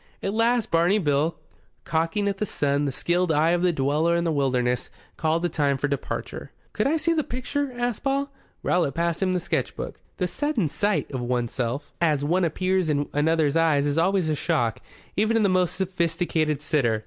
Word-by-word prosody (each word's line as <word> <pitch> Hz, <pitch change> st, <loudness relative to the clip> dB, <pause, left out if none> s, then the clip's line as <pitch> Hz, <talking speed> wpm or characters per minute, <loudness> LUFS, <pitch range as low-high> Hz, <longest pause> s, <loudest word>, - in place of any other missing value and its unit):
At 195 Hz, -, -1 dB
last 230 Hz, 0 st, +1 dB
Barney 170 Hz, +5 st, +3 dB
Bill, 155 Hz, -2 st, +1 dB, 0.5 s
cocking 165 Hz, +5 st, 0 dB
at 200 Hz, -1 st, -2 dB
the 210 Hz, -, 0 dB
sun 145 Hz, -2 st, 0 dB
the 140 Hz, -, 0 dB
skilled 175 Hz, +5 st, 0 dB
eye 160 Hz, +2 st, +3 dB
of 175 Hz, 0 st, +1 dB
the 180 Hz, 0 st, +3 dB
dweller 155 Hz, +3 st, +1 dB
in 170 Hz, -, +1 dB
the 170 Hz, -, 0 dB
wilderness, 125 Hz, -4 st, 0 dB, 0.3 s
called 160 Hz, +1 st, 0 dB
the -, -, +3 dB
time 145 Hz, -4 st, +1 dB
for 145 Hz, -, -1 dB
departure. 140 Hz, -1 st, -4 dB, 0.2 s
"Could -, -, +1 dB
I 315 Hz, +3 st, +2 dB
see 335 Hz, +2 st, +1 dB
th' 310 Hz, -4 st, -1 dB
picture?" 275 Hz, +3 st, -2 dB
asked 245 Hz, -2 st, -2 dB
Paul. 275 Hz, +1 st, 0 dB, 0.3 s
Rowlatt 170 Hz, -6 st, +1 dB
passed 170 Hz, +1 st, -1 dB
him 185 Hz, -1 st, +2 dB
the 180 Hz, -, +1 dB
sketch 175 Hz, -, -2 dB
book. -, -, -6 dB, 0.2 s
The 180 Hz, -, 0 dB
sudden 280 Hz, -, 0 dB
sight 205 Hz, +7 st, -1 dB
of 130 Hz, -3 st, -3 dB
oneself 125 Hz, +2 st, -2 dB
as 150 Hz, -4 st, +2 dB
one 180 Hz, +5 st, +2 dB
appears 185 Hz, +1 st, 0 dB
in 145 Hz, -1 st, 0 dB
another's 155 Hz, 0 st, +2 dB
eyes 160 Hz, -4 st, +3 dB
is 145 Hz, +2 st, +1 dB
always 185 Hz, 0 st, +2 dB
a 155 Hz, -, +1 dB
shock, 145 Hz, -7 st, 0 dB, 0.4 s
even 220 Hz, +3 st, +2 dB
to 225 Hz, -, +2 dB
the 200 Hz, -, +3 dB
most 185 Hz, -2 st, +1 dB
sophisticated 165 Hz, -5 st, -1 dB
sitter. 120 Hz, -9 st, +1 dB
165 Hz, 195 wpm, -25 LUFS, 145-190 Hz, 0.5 s, Barney